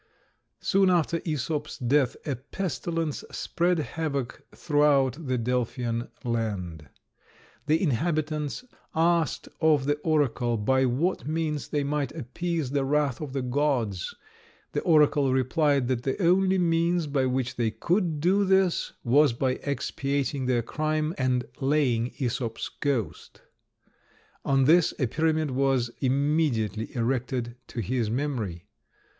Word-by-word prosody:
Soon 195 -1 +3
after 170 -1 +2
Æsop's 150 -1 -3
death 130 0 +1
a 140 - -1
pestilence 165 +2 -3
spread 175 +1 0
havoc 140 -3 -3
throughout 145 -1 +2
the 130 -1 +1
Delphian 120 -1 -1 0.2
land. 100 - -3 0.8
The 155 +1 +3
inhabitants 155 - -1 0.3
asked 165 0 +1
of 155 -4 +3
the 145 +1 +1
oracle 140 -7 +1
by 130 +5 +2
what 140 +2 -1
means 155 -2 -2
they 145 -1 -1
might 140 -2 -1
appease 160 0 -3
the 140 -1 +1
wrath 145 -1 0
of 145 -4 -5
the 135 -2 -2
gods; 125 - -1 0.6
the - - -1
oracle 150 -4 +4
replied, 135 +1 +2
that 125 -2 0
the 135 +1 -2
only 190 +1 +3
means 170 -1 +2
by 140 -3 0
which 130 0 -1
they 120 -2 +1
could 165 - 0
do 190 +6 +3
this 190 -2 +2
was 140 +2 +4
by 130 +2 0
expiating 140 -1 -2
their 120 -2 +1
crime 155 +4 -1
and 125 -1 +1
laying 135 -4 +1
Æsop's 120 -3 -2
ghost. 135 -7 -3 1.0
On 135 -1 +3
this 165 +3 +4
a 130 - +1
pyramid 155 +3 0
was 130 -2 +1
immediately 130 - 0
erected 120 0 -1
to 120 - -4
his 115 +1 -1
memory. 115 - -3
140 Hz, 125 wpm, -27 LUFS, 125-155 Hz, 1.0 s, oracle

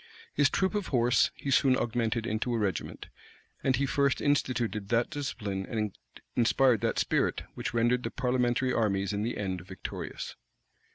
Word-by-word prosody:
His - - +4
troop 190 +1 +1
of 205 -2 -1
horse 120 -2 +3
he 140 - -4
soon 130 -1 +4
augmented 115 -1 -1
to 125 - 0
a - - +1
regiment; 100 -7 -2 0.6
and 130 - +3
he 140 +2 +1
first 140 0 +2
instituted 120 -7 0
that 120 +3 +2
discipline, 105 -10 -3
and 105 -3 -2 0.4
inspired 120 -1 +4
that - - 0
spirit, - - +1
which - - -4
rendered 120 +2 +3
the - - -3
parliamentary 125 0 +1
armies 100 -3 +1
in 100 - -1
the 115 +3 -2
end 95 -3 -2
victorious. 95 +1 -6
120 Hz, 160 wpm, -29 LUFS, 105-130 Hz, 0.6 s, His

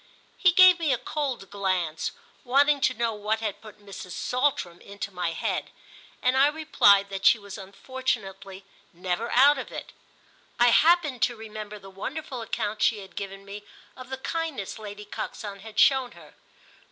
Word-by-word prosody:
He 365 - +4
gave 370 0 +7
me 320 -4 +1
a 255 - +2
cold 255 -4 -4
glance, 185 -5 -1 0.3
wanting 280 +3 +3
to 265 -3 +2
know 230 -1 0
what 210 +1 -1
had 215 -3 -4
put 215 -1 -13
Mrs. 195 -3 -9
Saltram 250 -10 -1
into 200 0 -7
my 175 -2 -2
head, - - -2 0.5
and 255 +1 +3
I 270 +2 +6
replied 250 -10 +4
that 195 0 -5
she 235 +2 +6
was 200 -2 -10
unfortunately 195 -2 -5 0.3
never 180 +6 -3
out 275 +3 +5
of - - -7
it. - - -7 0.7
I 240 0 +6
happened 305 -2 +4
to 240 - +2
remember 215 -1 -8
the 195 -1 -13
wonderful 260 +6 -6
accounts 215 -1 -3
she 225 - +3
had 190 - -13
given 195 0 -7
me 205 +1 -9 0.3
of 255 0 -11
the 265 - -4
kindness 295 - -4
Lady 210 -1 -8
Coxon 205 0 -6
had 220 +2 -12
shown 265 -2 +4
her. - - -16
220 Hz, 165 wpm, -26 LUFS, 200-265 Hz, 0.7 s, gave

